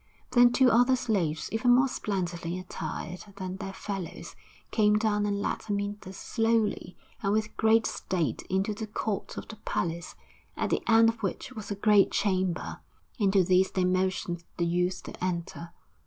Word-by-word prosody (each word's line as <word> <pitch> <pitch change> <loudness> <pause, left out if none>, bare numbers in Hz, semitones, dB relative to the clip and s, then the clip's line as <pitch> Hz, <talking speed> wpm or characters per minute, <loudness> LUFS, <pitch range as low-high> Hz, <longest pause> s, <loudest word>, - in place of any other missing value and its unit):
Then 245 -1 +6
two 250 0 +5
other 245 +3 +5
slaves, 190 -11 -1
even 245 +2 +4
more 260 +2 +4
splendidly 175 -7 -3
attired 180 -1 -6
than 185 -1 -5
their 195 -1 -5
fellows, 195 -3 -6 0.4
came 210 -1 +4
down 210 -1 +1
and 200 0 -1
led - - -1
Amyntas 200 -2 -3
slowly 225 -6 0 0.2
and 200 - 0
with 215 0 0
great 225 0 +4
state 165 -11 -2
into 190 +3 0
the 215 +1 -5
court 210 -1 -3
of - - -6
the 220 - -9
palace, 170 -5 -3 0.4
at - - -1
the - - +1
end 225 0 +7
of 225 0 -4
which 195 -4 -3
was 210 -2 -8
a 205 - -2
great 205 0 +5
chamber; 185 -3 -1 0.4
into 195 -2 +4
this 185 +1 +3
they 185 -1 0
motioned 185 -1 0
the 170 - +1
youth 180 +2 0
to - - -8
enter. 170 -1 -3
200 Hz, 165 wpm, -28 LUFS, 180-220 Hz, 0.4 s, end